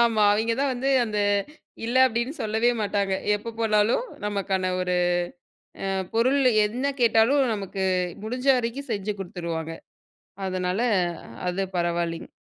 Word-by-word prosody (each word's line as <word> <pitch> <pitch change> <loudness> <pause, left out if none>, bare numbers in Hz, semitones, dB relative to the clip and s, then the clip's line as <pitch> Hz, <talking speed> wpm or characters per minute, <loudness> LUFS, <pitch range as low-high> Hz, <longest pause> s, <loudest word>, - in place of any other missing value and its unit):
ஆமா. 230 -2 +3
அவிங்க 220 +2 +1
தான் 280 -1 +2
வந்து 265 +3 -1
அந்த 215 -2 -2 0.7
இல்ல 240 +3 0
அப்டினு 235 +3 -2
சொல்லவே 220 +3 +2
மாட்டாங்க. 200 -1 0 0.2
எப்ப 225 +2 -6
போனாலும் 220 - +2 0.2
நமக்கான 195 -2 -1
ஒரு 180 0 0 0.9
அ 195 - 0 0.2
பொருள் 255 +5 +3 0.3
என்ன 240 +6 -4 0.2
கேட்டாலும். 235 +4 +4
நமக்கு 195 -1 -4 0.4
முடிஞ்ச 250 +4 -4
வரைக்கும் 250 +3 -3
செஞ்சு 205 0 -2
கொடுத்துருவாங்க. 170 -3 -4 0.7
அதனால 185 +1 -1 0.7
அது 180 +2 0
பரவாயில்லைங்க. 170 -1 -1
210 Hz, 120 wpm, -25 LUFS, 190-235 Hz, 0.9 s, கேட்டாலும்